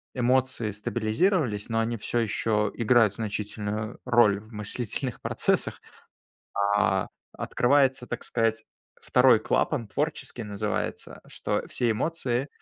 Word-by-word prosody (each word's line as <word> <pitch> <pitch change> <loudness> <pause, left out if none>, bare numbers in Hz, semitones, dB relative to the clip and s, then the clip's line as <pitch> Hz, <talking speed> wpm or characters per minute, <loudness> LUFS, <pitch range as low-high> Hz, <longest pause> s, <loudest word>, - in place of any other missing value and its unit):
эмоции 125 -3 +1
стабилизировались, 110 - 0
но 115 0 +1
они 115 +1 -1
всё 120 +3 -2
еще 105 -1 0
играют 115 -3 +4
значительную 105 0 -4
роль 120 -5 +4
в 110 +2 -17
мыслительных 115 +4 -3
процессах. - - 0 1.0
А, 95 -2 +2 0.3
открывается, 130 0 +2
так 120 - -5
сказать, 115 -1 0 0.4
2 - - +5
клапан, 115 - 0
творческий 145 -3 -2
называется, 105 0 -3
что - - -2
все 120 -2 0
эмоции 130 0 -1
115 Hz, 110 wpm, -27 LUFS, 105-125 Hz, 1.0 s, 2